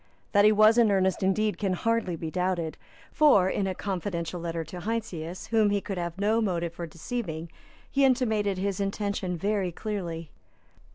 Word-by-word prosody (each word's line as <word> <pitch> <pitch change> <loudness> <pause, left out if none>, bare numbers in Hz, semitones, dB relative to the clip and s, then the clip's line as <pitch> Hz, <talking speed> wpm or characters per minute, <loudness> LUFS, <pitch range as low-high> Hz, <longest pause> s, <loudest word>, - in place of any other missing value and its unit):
That 205 0 +5
he 215 - +7
was 215 +2 +6
in 230 -2 +5
earnest, 190 -2 +2
indeed, 205 +2 +1
can 195 -3 0
hardly 230 -2 0
be 160 -1 -5
doubted. 180 -3 -1 0.4
For, 275 -12 +5
in 195 +1 0
a 190 - -2
confidential 175 -3 -3
letter 165 -1 -3
to 170 +3 -8
Heinsius, 185 -5 -4
whom 220 -2 +4
he 205 0 +1
could 195 -2 -5
have 170 0 -4
no 215 +3 +2
motive 170 -5 -1
for 170 0 -6
deceiving, 165 -1 -5 0.4
he 275 - +2
intimated 220 -7 +2
his 195 0 -2
intention 200 -2 -2
very 195 0 0
clearly. 170 -5 -5
195 Hz, 170 wpm, -27 LUFS, 170-215 Hz, 0.4 s, he